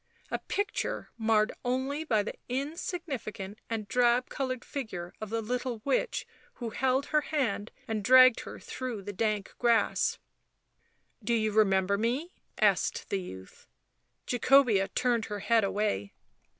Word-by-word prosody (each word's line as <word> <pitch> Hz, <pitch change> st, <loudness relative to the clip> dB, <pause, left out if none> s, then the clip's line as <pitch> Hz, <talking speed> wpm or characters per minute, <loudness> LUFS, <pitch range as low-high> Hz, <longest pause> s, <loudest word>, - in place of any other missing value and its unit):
A -, -, -1 dB
picture 405 Hz, +1 st, -3 dB
marred 220 Hz, -1 st, +2 dB
only 265 Hz, +5 st, -1 dB
by 220 Hz, -9 st, +2 dB
the -, -, -5 dB, 0.2 s
insignificant 270 Hz, -, -4 dB
and 220 Hz, -2 st, -3 dB
drab 245 Hz, +2 st, +3 dB
coloured 255 Hz, -2 st, -3 dB
figure 180 Hz, -11 st, -5 dB
of 215 Hz, -, -5 dB
the 225 Hz, +1 st, -2 dB
little 245 Hz, +1 st, -2 dB
witch 280 Hz, -, 0 dB, 0.3 s
who 235 Hz, -3 st, -5 dB
held 265 Hz, +3 st, +1 dB
her 300 Hz, 0 st, +2 dB
hand 250 Hz, -9 st, -1 dB, 0.2 s
and 220 Hz, -2 st, -2 dB
dragged 255 Hz, +1 st, +8 dB
her -, -, -8 dB
through 245 Hz, -6 st, -5 dB
the 205 Hz, +1 st, -6 dB
dank 210 Hz, 0 st, -1 dB
grass. 235 Hz, -2 st, +2 dB, 1.1 s
"Do 235 Hz, -, +1 dB
you 215 Hz, -1 st, +1 dB
remember 200 Hz, -2 st, +3 dB
me?" 260 Hz, +11 st, -1 dB, 0.3 s
asked -, -, +2 dB
the 195 Hz, -, 0 dB
youth. 95 Hz, -, -11 dB, 0.6 s
Jacobea 245 Hz, -5 st, +4 dB
turned 240 Hz, -3 st, +1 dB
her 205 Hz, -1 st, -5 dB
head 230 Hz, -2 st, +3 dB
away. 195 Hz, -, -1 dB
230 Hz, 135 wpm, -30 LUFS, 210-255 Hz, 1.1 s, dragged